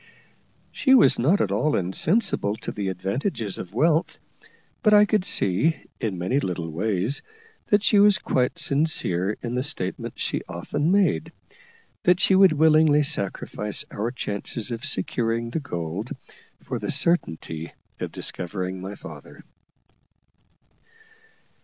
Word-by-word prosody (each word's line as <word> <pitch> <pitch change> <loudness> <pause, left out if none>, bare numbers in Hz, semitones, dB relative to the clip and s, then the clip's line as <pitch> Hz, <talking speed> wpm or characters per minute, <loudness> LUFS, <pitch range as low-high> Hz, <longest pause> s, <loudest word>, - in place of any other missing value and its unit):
She 265 -2 +4
was 220 - +5
not 160 +12 +3
at 100 - 0
all 145 +10 +1
insensible 100 - 0
to - - -6
the 100 -2 -4
advantages 100 - -3
of 90 - -7
wealth; 160 +5 +2 0.6
but 215 -4 +5
I 210 0 +7
could 210 -2 +1
see, 145 - +1 0.2
in 105 -6 -2
many 95 +11 0
little 85 - -3
ways, 100 - -1 0.5
that 205 0 +3
she 210 - +4
was 205 -1 +6
quite 125 -1 -1
sincere 140 - +1
in 120 0 -3
the 125 - 0
statement 110 -10 -3
she - - -1
often 145 - -2
made, 185 - +2 0.7
that 180 0 +3
she 190 - +3
would 190 -3 +6
willingly 155 -1 +4
sacrifice 105 -5 -3
our 110 +3 -2
chances 115 0 -3
of 115 +2 -5
securing 115 -2 -1
the 165 - -1
gold 90 - -5 0.5
for - - -4
the - - -5
certainty 80 - 0 0.3
of - - -4
discovering 90 0 -3
my 95 +2 -6
father. - - -12
120 Hz, 135 wpm, -24 LUFS, 95-160 Hz, 0.7 s, I